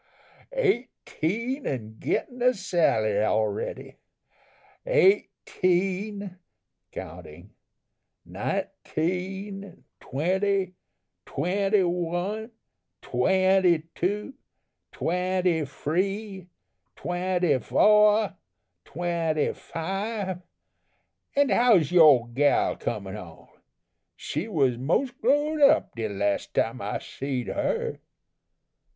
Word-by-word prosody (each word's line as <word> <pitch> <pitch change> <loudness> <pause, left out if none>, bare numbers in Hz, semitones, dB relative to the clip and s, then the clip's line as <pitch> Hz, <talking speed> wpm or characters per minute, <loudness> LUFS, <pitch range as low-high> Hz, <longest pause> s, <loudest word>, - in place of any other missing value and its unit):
Eighteen 255 - -1
and 110 -4 -5
gettin' 250 0 -2
a 250 0 +4
salary 110 - +1
already! 110 -1 -2 0.9
eighteen 200 - +1 0.5
(counting), - - -10 0.7
nineteen, 190 +3 -4 0.2
twenty, 185 +6 0 0.5
twenty 195 +6 +1
one, 180 +5 -2 0.5
twenty 185 +4 +3
two, 205 +8 -2 0.6
twenty 180 -2 0
free, 190 +7 -3 0.5
twenty 180 -4 0
foah, 210 - +4 0.5
twenty 165 -3 -1
five, 195 +2 -4 0.9
and 285 -1 +3
how's 210 - +4
yore 150 -9 +6
gal 140 +4 +2
comin' 100 -3 -4
on? 85 -6 -11 0.7
She 155 +8 -4
was 135 - +1
mos' 170 - +1
growed 290 +6 +1
up 280 - +5
de 110 -2 -3
las' 100 0 -1
time - - -1
I - - -2
seed 135 -3 -4
her." - - -2
185 Hz, 75 wpm, -26 LUFS, 155-205 Hz, 0.9 s, yore